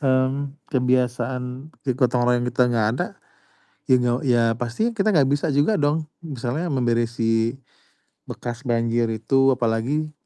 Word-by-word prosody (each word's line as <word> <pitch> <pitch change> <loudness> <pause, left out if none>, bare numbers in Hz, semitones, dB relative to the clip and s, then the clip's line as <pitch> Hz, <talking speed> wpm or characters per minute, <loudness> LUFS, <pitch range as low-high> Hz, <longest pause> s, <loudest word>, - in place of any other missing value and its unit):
mmm, 135 +1 0 0.2
kebiasaan, 125 +1 -1 0.2
e 130 - +1
gotong 125 -1 +1
royong 125 0 +2
kita 125 - +1
gak 115 -2 +2
ada, - - -1 0.8
ya 130 - +6
gak 120 -1 +1
ya 120 -1 +4 0.2
pasti 125 - -1
kita 215 -2 0
gak 145 - +5
bisa 145 +3 0
juga 150 +7 +2
dong 150 +2 +1 0.2
misalnya 145 +1 -3
memberisi 115 -3 0 0.7
bekas 120 +2 -7
banjir 115 0 +1
itu 135 +4 +3
apalagi 125 +6 -1
125 Hz, 135 wpm, -23 LUFS, 120-140 Hz, 0.8 s, ya